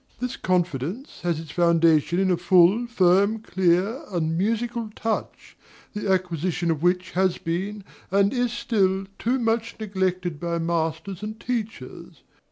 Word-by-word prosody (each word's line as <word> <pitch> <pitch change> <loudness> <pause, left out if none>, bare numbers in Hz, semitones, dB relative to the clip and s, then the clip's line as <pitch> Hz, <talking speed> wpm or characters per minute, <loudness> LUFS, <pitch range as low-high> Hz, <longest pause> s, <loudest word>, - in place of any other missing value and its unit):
This 250 0 -3
confidence 180 - -2
has 170 -3 -1
its 160 -2 -9
foundation 170 -1 +3
in 190 0 +2
a 180 - +2
full, 180 +6 +4
firm, 200 -1 +3
clear, 190 - +1
and 165 -3 -1
musical 230 +4 -1
touch, 225 -1 -4 0.4
the 210 -1 -3
acquisition 175 -2 0
of 155 -2 -2
which 180 +1 +1
has 185 -1 +1
been, 195 +5 -3 0.3
and 200 +3 +3
is 245 -2 0
still, 195 -5 0
too 245 +3 +1
much 230 -1 -1
neglected 185 -5 -2
by 170 -1 -2
masters 165 +3 -2
and 215 +1 -6
teachers. 230 -3 -5
185 Hz, 140 wpm, -24 LUFS, 170-220 Hz, 0.4 s, full